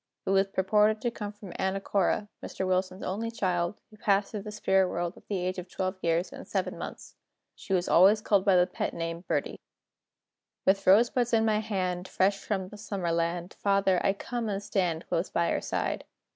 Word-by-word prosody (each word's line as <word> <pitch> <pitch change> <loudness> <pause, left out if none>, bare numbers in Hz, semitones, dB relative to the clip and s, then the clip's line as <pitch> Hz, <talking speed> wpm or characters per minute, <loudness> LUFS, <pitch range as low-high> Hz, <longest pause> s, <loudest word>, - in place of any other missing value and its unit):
It 195 0 +2
purported 210 +3 +3
to 240 - 0
come 210 -3 -5
from 205 -4 -11
Anna 190 +1 0
Cora, 200 +2 0 0.2
Mr. 190 - -4
Wilson's 185 +1 -1
only 220 +5 -2
child, 185 -4 -1
who 215 - -16
passed 200 -1 +1
to 210 - -4
the 210 +1 -7
spirit 190 -3 +2
world 175 +1 -2
at - - -18
the 200 - -1
age 185 +1 -2
of 180 0 -8
12 185 +1 -2
years 170 +2 0
and - - -9
7 - - -2
months. - - -8 0.4
She - - -11
was 180 -2 +2
always 195 +5 +6
called 205 -2 +2
by 195 -2 +4
the 180 0 +5
pet 180 - -4
name 165 +1 -4
"Birdie."] - - -1 1.1
With 195 +1 +2
rosebuds 235 +4 +4
in 225 -1 +4
my 215 -1 +2
hand, 185 -4 -2
Fresh 195 +2 +1
from 190 -3 -3
the 210 - -11
Summer 195 -5 -2
land, 170 +1 -1
Father, 195 -2 +2
I 195 - +3
come 235 +2 -4
and 200 0 -2
stand 180 -5 -1
Close 170 +3 -1
by 170 0 +1
your - - 0
side. - - -2
195 Hz, 200 wpm, -28 LUFS, 180-210 Hz, 1.1 s, always